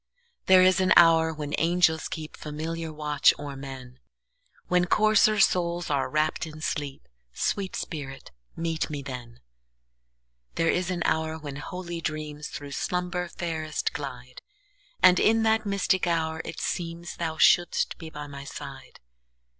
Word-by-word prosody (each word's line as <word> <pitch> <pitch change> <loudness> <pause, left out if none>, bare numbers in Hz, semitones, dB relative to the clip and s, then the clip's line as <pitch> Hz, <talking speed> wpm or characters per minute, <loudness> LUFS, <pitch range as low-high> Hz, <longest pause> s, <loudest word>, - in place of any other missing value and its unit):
There 185 -1 +7
is 185 0 +5
an 185 0 +4
hour 165 -1 +6
when 150 -2 -6
angels 165 -1 +2
keepFamiliar 160 +1 -5
watch 150 -2 +3
o'er 145 -1 -6
men, 130 -2 -9 0.7
When 180 0 +2
coarser 215 +2 +4
souls 175 -3 +2
are 140 -2 0
wrapp'd 155 +1 0
in 155 0 -10
sleep—Sweet 140 - -4
spirit, 135 -4 -6 0.2
meet 165 -1 -2
me 145 -2 -5
then! 125 -3 -8 1.1
There 165 0 +2
is 180 0 -1
an 175 -2 -1
hour 160 0 0
when 145 -3 -7
holy 170 +2 -6
dreamsThrough 150 -2 -5
slumber 180 +1 -2
fairest 160 -3 -3
glide; 125 -3 -7 0.6
And 180 -1 +7
in 225 +1 +4
that 220 -1 +2
mystic 190 -2 +1
hour 160 -1 0
it - - -7
seemsThou 170 -1 -4
shouldst 175 0 +4
be 160 - -8
by 150 -1 -7
my 140 -1 -9
side. 140 -1 -9
160 Hz, 130 wpm, -27 LUFS, 145-175 Hz, 1.1 s, There